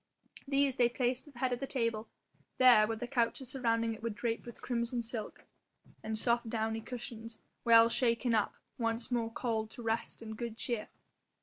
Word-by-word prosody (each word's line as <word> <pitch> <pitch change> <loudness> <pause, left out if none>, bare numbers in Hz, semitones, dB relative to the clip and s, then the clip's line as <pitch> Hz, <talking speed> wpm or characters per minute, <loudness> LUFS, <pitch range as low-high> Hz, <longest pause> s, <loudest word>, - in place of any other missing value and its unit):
These 275 -1 +2
they 240 -1 +5
placed 250 +2 -1
at 295 - -14
the 240 - -12
head 255 -1 +2
of 245 - -2
the 275 - -3
table, 230 -4 -1 0.5
there, 245 -5 +7
where 225 0 -2
the 245 - -4
couches 245 +1 0
surrounding 230 -3 +1
it 220 - -10
were 230 - -1
draped 225 +2 -3
with 235 - -9
crimson 235 -1 -1
silk, 225 -2 -5 0.6
and 220 0 -3
soft 235 +1 +1
downy 220 0 -1
cushions, 230 -2 -7 0.3
well 230 -1 +8
shaken 235 0 +2
up, 215 -2 +1 0.2
once 230 +1 -1
more 235 -2 +1
called 225 -2 -1
to 240 - -10
rest 225 0 -1
and 220 -1 -6
good 230 0 -5
cheer. 235 -3 -2
235 Hz, 185 wpm, -33 LUFS, 225-245 Hz, 0.6 s, well